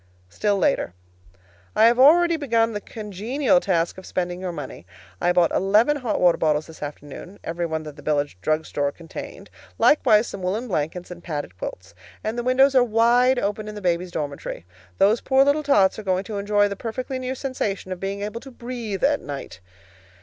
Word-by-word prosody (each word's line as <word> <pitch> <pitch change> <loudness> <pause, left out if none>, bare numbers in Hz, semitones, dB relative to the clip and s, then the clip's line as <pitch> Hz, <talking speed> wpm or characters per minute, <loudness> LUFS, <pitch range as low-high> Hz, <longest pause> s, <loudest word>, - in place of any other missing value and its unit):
STILL 205 - 0
LATER. 90 - 0 0.8
I 220 - +6
have 235 +2 +4
already 335 +5 +6
begun 230 -7 +1
the 205 - -4
congenial 230 +8 0
task 175 -5 0
of 190 - -13
spending 180 0 -3
your 185 -1 -3
money. 145 - -8 0.4
I 175 - +3
bought 175 -2 +3
eleven 215 +10 +3
hot 245 -6 -2
water 175 -2 +4
bottles 155 -1 +1
this 160 - -14
afternoon 150 +6 -8
(every 170 +1 -3
one 160 -1 -3
that 150 -1 -10
the - - -11
village 145 -5 -1
drug 155 +5 0
store 145 -1 -1
contained) 165 +2 -10 0.3
likewise 215 -7 +4
some 200 - -7
woolen 205 +7 -2
blankets 175 -1 -3
and 175 -1 -10
padded 145 - -5
quilts. 95 +1 -7 0.3
And 215 +1 -2
the 240 - -2
windows 260 +3 +4
are 255 -2 +6
wide 240 +3 +3
open 210 -1 -2
in 210 - -7
the - - -5
babies' 180 -1 0
dormitory. 145 - -5 0.3
Those 215 +4 +3
poor 265 0 +4
little 285 +2 +2
tots 215 -10 +3
are - - -7
going 185 -1 0
to 205 -1 -5
enjoy 205 0 +2
the 200 - -4
perfectly 255 +5 -4
new 255 +1 -3
sensation 215 -8 -3
of 185 - -4
being 195 +1 -4
able 210 +3 -5
to 270 - -11
breathe 235 -5 -6
at 285 +1 +3
night. 140 -9 -7
200 Hz, 195 wpm, -23 LUFS, 170-240 Hz, 0.8 s, I